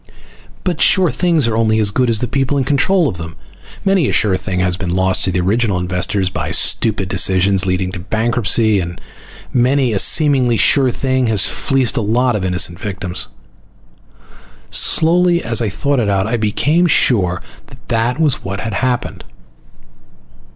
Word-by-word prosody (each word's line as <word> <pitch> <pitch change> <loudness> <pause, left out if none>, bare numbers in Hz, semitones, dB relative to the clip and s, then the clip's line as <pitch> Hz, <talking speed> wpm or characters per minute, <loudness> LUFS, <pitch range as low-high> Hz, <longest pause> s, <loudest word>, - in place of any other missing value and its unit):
But 175 -4 -3
sure 185 -5 +3
things 165 -1 0
are 115 - -1
only 110 -1 +1
as 105 -2 +2
good 125 +4 0
as 110 -2 +2
the 125 - -1
people 135 +3 -1
in 135 - 0
control 155 +6 +1
of 90 - -4
them. 85 0 -8 0.5
Many 195 -7 +2
a - - -3
sure 100 -3 +1
thing 95 -1 -4
has 90 -1 0
been 95 -1 -5
lost 95 0 +1
to 95 - 0
the 90 0 -1
original 100 +1 0
investors 90 +1 -2
by - - -4
stupid 105 -4 +1
decisions 95 +1 +1
leading 90 0 -1
to 90 - -7
bankruptcy, 110 +1 0
and 85 -1 -6 0.5
many 125 0 +1
a 100 - 0
seemingly 130 - +3
sure 135 +5 +3
thing 130 0 -1
has 105 -4 +3
fleeced 135 -3 0
a - - +1
lot 120 +3 0
of 100 - -3
innocent 90 -1 0
victims. 95 -4 -5 1.4
Slowly, 175 +1 +3
as 115 0 0
I 110 - -1
thought 140 +8 -1
it 110 -4 -1
out, 95 -1 0
I 115 +3 -2
became 145 +11 0
sure 95 - +1 0.3
that 125 -1 -18
that 120 +4 -1
was 150 -5 0
what 100 0 -5
had 110 -1 -5
happened. 125 +3 -3
110 Hz, 170 wpm, -16 LUFS, 95-130 Hz, 1.4 s, sure